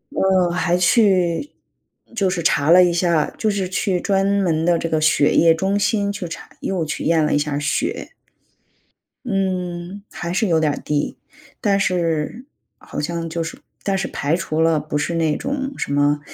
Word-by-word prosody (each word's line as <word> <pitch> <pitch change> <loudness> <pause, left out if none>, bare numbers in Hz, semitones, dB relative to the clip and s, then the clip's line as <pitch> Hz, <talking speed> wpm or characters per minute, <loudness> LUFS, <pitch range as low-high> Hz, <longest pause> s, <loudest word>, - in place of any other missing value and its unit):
嗯， 190 -2 +3
还 175 0 +1
去 185 - +2 0.6
就 200 -4 +1
是 180 -2 -2
查 150 -2 +2
了 180 +1 +8
一 175 -1 +2
下， 170 -3 +1
就 220 - 0
是 195 -2 -2
去 185 0 -1
专 195 +1 +1
门 190 -5 +1
的 170 0 +2
这 165 - -2
个 155 -1 0
血 155 -2 +3
液 165 -1 +6
中 190 +5 0
心 205 0 +1
去 200 -3 -5
查 - - -8
又 180 -4 -2
去 155 - -4
验 165 -1 +2
了 150 - 0
一 - - +3
下 145 -1 -1
血。 145 +1 -2 1.1
嗯， 185 -2 -3
还 170 - -5
是 215 +4 +1
有 165 -3 +3
点 150 -2 0
低。 145 -1 -1 0.4
但 200 -4 +2
是， 175 - -1 0.3
好 - - -8
像 165 +2 -3
就 165 +1 -2
是 165 - -7 0.2
但 195 -1 0
是 190 - -2
排 145 +3 -1
除 160 -2 -2
了 165 -1 +3
不 150 0 -3
是 170 +3 -2
那 160 -2 +1
种 275 -1 -3
什 - - -3
么， 145 +1 +2
175 Hz, 195 characters per minute, -20 LUFS, 160-195 Hz, 1.1 s, 了